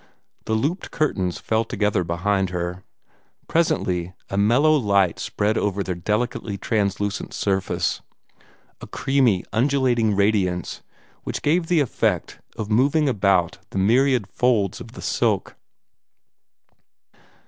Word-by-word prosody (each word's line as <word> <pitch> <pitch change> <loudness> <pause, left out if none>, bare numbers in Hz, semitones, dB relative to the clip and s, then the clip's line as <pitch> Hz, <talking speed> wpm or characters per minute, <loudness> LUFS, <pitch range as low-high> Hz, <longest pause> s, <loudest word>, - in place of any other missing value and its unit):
The 110 - 0
looped 150 - -1
curtains 95 - -1
fell 110 0 0
together 105 -4 0
behind 95 +3 0
her. 90 +1 -4 0.6
Presently 95 - 0 0.2
a - - -2
mellow 120 +10 +4
light 100 - +2
spread 105 +2 0
over 100 -1 -1
their 95 - -3
delicately 105 +3 -2
translucent 100 -1 -2
surface 95 -1 -1 0.8
a - - -8
creamy, 130 -9 +1
undulating 120 -3 +2
radiance 95 -4 0 0.4
which - - -5
gave 165 +3 +2
the 170 -3 +3
effect 135 - -1 0.2
of 110 0 -4
moving 145 +7 +3
about 100 -7 +2
among - - -33 0.2
the 110 - +4
myriad 130 -4 +3
folds 105 -3 0
of - - -11
the - - -9
silk. - - 0
105 Hz, 120 wpm, -23 LUFS, 95-125 Hz, 0.8 s, mellow